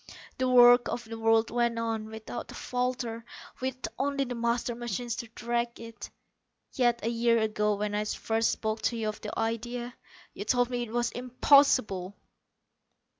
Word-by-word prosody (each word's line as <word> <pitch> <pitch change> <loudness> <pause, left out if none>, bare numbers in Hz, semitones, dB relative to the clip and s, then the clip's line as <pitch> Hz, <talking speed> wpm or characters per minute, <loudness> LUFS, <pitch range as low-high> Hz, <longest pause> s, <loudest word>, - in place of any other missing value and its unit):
The 255 0 +1
work 245 -1 +7
of 240 - -3
the 225 0 -8
world 225 0 +3
went 235 0 +1
on, 225 -1 -2
without 220 +2 -7
a - - -10
falter, 245 -2 -2 0.4
with 260 0 -3
only 280 0 0
the 250 -2 -4
master 235 0 -1
machine 240 0 -4
to 235 +1 -3
direct 235 +1 -2
it. 230 0 -9 0.6
Yet 240 -3 +1
a - - +1
year 235 0 +2
ago, 210 -1 +1
when 205 +1 -2
I 210 +1 0
first 225 +1 0
spoke 220 0 -2
to 235 - -5
you 220 -1 -1
of 210 - -7
the 210 - -6
idea, 240 +2 -3 0.4
you 200 - -5
told 245 +3 +1
me 245 -1 -1
it 235 -2 -5
was 240 0 0
impossible!" 245 -6 +3
235 Hz, 170 wpm, -29 LUFS, 225-245 Hz, 0.6 s, work